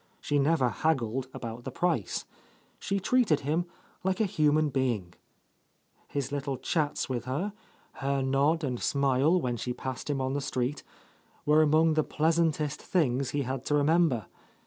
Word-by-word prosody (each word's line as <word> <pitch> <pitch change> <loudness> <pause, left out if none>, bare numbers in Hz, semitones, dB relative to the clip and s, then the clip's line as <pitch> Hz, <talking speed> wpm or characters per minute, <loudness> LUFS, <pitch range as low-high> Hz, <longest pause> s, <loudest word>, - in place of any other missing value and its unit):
She 145 -1 0
never 140 -3 +3
haggled 130 -3 0
about 115 -1 -7
the - - -4
price. 165 - -1 0.5
She 200 0 -1
treated 195 - +2
him 160 +5 0 0.4
like 190 0 0
a 220 - +3
human 155 -4 +2
being. 120 -10 -1 0.9
His 140 -1 -3
little 140 -2 -2
chats 150 0 -1
with 125 -3 -3
her, 155 +11 -2 0.4
her 135 0 -1
nod 140 +5 +2
and 125 -4 -2
smile 140 +5 +2
when 125 -6 -2
she 125 +2 -3
passed 130 +3 -5
him 140 -2 0
on 130 0 -1
the 145 - -1
street, 135 +1 -2 0.6
were 150 +1 +5
among 155 +1 +4
the 155 0 +2
pleasantest 155 -2 +1
things 135 -7 +1
he 145 -1 -1
had 130 0 -4
to 150 - +1
remember. 145 - +3
145 Hz, 155 wpm, -29 LUFS, 130-160 Hz, 0.9 s, were